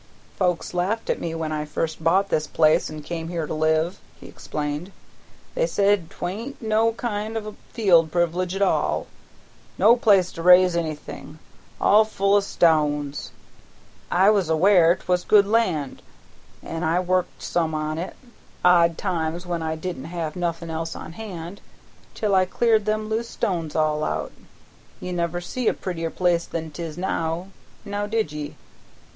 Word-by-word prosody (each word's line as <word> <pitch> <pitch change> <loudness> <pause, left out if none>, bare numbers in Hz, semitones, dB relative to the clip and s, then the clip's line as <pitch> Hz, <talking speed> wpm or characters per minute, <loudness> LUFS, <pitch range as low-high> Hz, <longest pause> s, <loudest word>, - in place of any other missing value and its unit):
"Folks 180 -3 -1
laughed 190 +6 -1
at - - -3
me 165 -1 -3
when 160 -1 -3
I 150 -1 -2
first 160 +1 -3
bought 190 +5 +3
this 155 -1 0
place 155 0 +3
an' 155 -1 -8
come 165 0 -5
here 165 -2 -3
to - - -5
live," 160 +3 +1 0.2
he - - -12
explained. 150 +5 -5 0.6
"They - - +1
said 200 - +1
'twa'n't 225 +10 -5
no 225 0 +2
kind 220 -1 -3
of 215 - -4
a 215 - -6 0.2
field 175 -8 +4
privilege 175 +2 0
at 200 - +1
all; - - +1 0.7
no 235 - +6
place 200 -7 +3
to 165 - -7
raise 180 0 +6
anything, 155 -2 -5 0.4
all 215 +2 +6
full 200 -2 0
o' 205 - +6
stones. 150 -6 +1 0.8
I 190 +4 +5
was 195 -6 +1
aware 170 +1 +5
'twas 180 -1 -1
good 205 -2 +5
land, 185 - 0 0.6
an' 165 +1 -5
I 165 +3 +2
worked 185 0 -1
some 160 -2 0
on 155 +1 -2
it 180 - -5 0.5
odd 170 -2 +5
times 170 -2 -2
when 175 -2 -3
I 160 0 -2
didn't 165 -3 -5
have 165 -2 -4
nothin' 170 -2 -3
else 165 +1 -4
on 160 - -8
hand 185 -3 -8 0.5
till 210 -2 0
I 185 -1 +4
cleared 220 +2 +2
them 215 0 -1
loose 225 +2 -2
stones 170 -9 -2
all 155 -1 +1
out. 75 0 -2 0.7
You 180 - -5
never 170 0 -1
see 230 +7 -4
a - - +3
prettier 165 -3 -4
piece 175 -1 +1
than 160 -1 -5
'tis 160 -1 -6
now; 175 0 -2 0.4
now 205 0 -3
did 220 -7 -1
ye? 150 -1 -6
175 Hz, 165 wpm, -23 LUFS, 160-200 Hz, 0.8 s, no